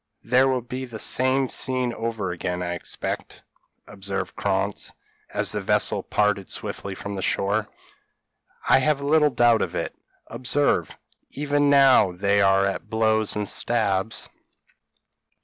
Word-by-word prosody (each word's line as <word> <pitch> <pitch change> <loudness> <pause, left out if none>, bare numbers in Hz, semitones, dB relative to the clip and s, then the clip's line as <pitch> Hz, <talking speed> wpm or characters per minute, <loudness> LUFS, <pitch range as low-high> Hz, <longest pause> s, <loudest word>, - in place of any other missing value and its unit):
p> - - -20
"There 130 +2 +5
will 130 -2 0
be 130 +2 -5
the 120 -3 -8
same 130 +4 +1
scene 125 -1 -1
over 115 -5 -3
again, 90 +1 -3
I 90 0 -2
expect," 85 - -4 0.4
observed 95 -1 -5
Krantz, 100 0 -2 0.4
as - - 0
the - - -2
vessel - - +2
parted 105 -2 0
swiftly 100 -1 -6
from 100 +1 -6
the 95 - -4
shore. 105 +3 0 1.0
"I - - +6
have 140 +1 +1
little 150 +1 +3
doubt 120 -3 +3
of - - -3
it; - - -3 0.3
observe, 130 - 0 0.4
even 145 0 0
now 135 -9 +5
they 100 +3 +1
are 95 0 +4
at 100 - -3
blows 110 -1 +1
and 105 -1 -2
stabs." 110 -3 -1
110 Hz, 140 wpm, -24 LUFS, 100-130 Hz, 1.0 s, I